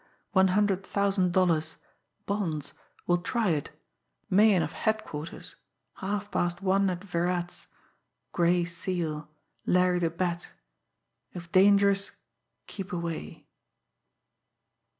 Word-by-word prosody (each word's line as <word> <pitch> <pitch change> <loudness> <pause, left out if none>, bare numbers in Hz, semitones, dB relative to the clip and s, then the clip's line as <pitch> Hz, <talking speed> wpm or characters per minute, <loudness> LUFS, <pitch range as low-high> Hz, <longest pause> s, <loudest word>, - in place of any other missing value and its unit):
one 190 -2 +5
hundred 195 0 +2
thousand 195 -3 +1
dollars... 165 -4 +1 0.5
bonds... 165 -8 -2 0.3
will 175 0 +2
try 220 +3 0
it... 150 -3 -1 0.6
Meighan 200 -2 +5
of - - -4
headquarters... 215 -8 -4 0.4
half 205 +1 -3
past 175 0 0
one 195 +1 +3
at 180 0 -4
Virat's... 175 -1 -2 0.6
Gray 175 0 +2
Seal... 170 -3 -3 0.4
Larry 180 0 +3
the 170 -2 +1
Bat... 170 0 -3 0.9
if 170 -1 -8
dangerous, 200 +1 +4 0.5
keep 195 -2 -7
away 170 - -5
180 Hz, 100 wpm, -28 LUFS, 170-195 Hz, 0.9 s, one